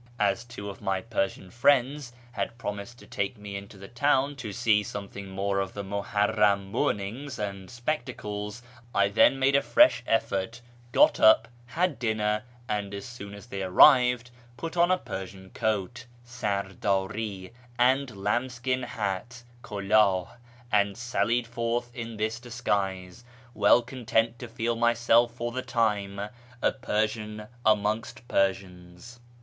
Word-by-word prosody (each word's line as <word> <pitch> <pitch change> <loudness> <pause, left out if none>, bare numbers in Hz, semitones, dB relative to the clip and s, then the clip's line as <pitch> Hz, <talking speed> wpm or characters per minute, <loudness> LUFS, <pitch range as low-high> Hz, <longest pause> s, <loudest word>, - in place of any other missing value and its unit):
As 105 +1 +1
two 115 -4 -8
of 100 -1 -8
my 95 -2 0
Persian 95 -3 -3
friends 130 +2 +2 0.2
had 120 - -4
promised 105 +1 -6
to - - -15
take 100 +4 -3
me 105 -1 -8
into 100 0 -8
the 95 0 -10
town 140 +3 +1
to 115 -6 -5
see 110 -2 +3
some 100 0 -6
thing 100 -1 -9
more 100 +1 -1
of 95 -1 -3
the 100 - -4
Muharram 100 0 +1
mournings 125 +3 -2
and 100 -2 -5
spectacles, 120 -4 -4 0.3
I 100 0 +4
then 110 +6 +5
made 135 +1 +3
a 140 - +5
fresh 300 - +5
effort, 115 0 0 0.3
got - - +5
up, 110 +1 +6 0.2
had 165 +1 0
dinner, 105 -2 0 0.3
and, 100 -1 -2
as 100 - -6
soon 100 -5 -9
as 100 - -11
they 100 -5 -5
arrived, 125 +5 +5 0.3
put 165 +6 -5
on 175 0 +4
a 185 - +4
Persian 95 - -8
coat 110 +3 -2 0.2
(sarddri) 100 -3 -2 0.3
and 125 -2 +2
lambskin 125 +5 -1
hat 115 +1 -4 0.2
{kuldli), 100 -3 +2 0.4
and 100 -1 +2
sallied 120 0 0
forth 120 +1 -2
in 115 -2 -6
this 110 +2 -1
disguise, 105 -4 -2 0.3
well 105 +3 +5
content 115 -2 -1
to 120 - -6
feel 115 0 -2
myself 120 0 +3
for 120 0 -3
the 130 +2 -3
time 105 -5 0 0.4
a - - +2
Persian 110 -3 -2 0.2
amongst 110 +2 0
Persians. 95 +3 -2
110 Hz, 140 wpm, -27 LUFS, 100-120 Hz, 0.4 s, up